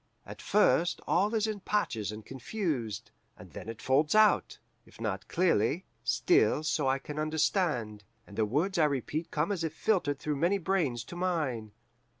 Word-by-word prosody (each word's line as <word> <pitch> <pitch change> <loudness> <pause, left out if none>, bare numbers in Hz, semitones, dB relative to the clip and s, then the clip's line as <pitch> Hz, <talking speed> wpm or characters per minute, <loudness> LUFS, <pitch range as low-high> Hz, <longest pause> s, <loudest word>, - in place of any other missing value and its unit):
At - - -10
first 175 -4 +3
all 205 +6 +2
is 215 -1 +2
in 215 -2 -3
patches 115 - -1
and 105 0 -9
confused, 135 - -3 0.3
and - - -13
then - - -8
it 115 - -8
folds 145 +7 +2
out 215 0 +4 0.3
if - - -19
not - - -3
clearly, 170 - +1 0.2
still 115 +3 +3
so 150 -2 0
I 135 +1 +2
can 150 +2 -7
understand 155 - 0 0.2
and 100 - -13
the 110 - +1
words 170 - 0
I 155 - +5
repeat 150 +4 -2
come 150 +6 -1
as 185 -5 -2
if 160 -1 -3
filtered 165 -10 +1
through 150 0 -3
many 175 +7 +2
brains 165 - 0
to 175 - -10
mine. 150 - -2
155 Hz, 170 wpm, -30 LUFS, 120-185 Hz, 0.3 s, I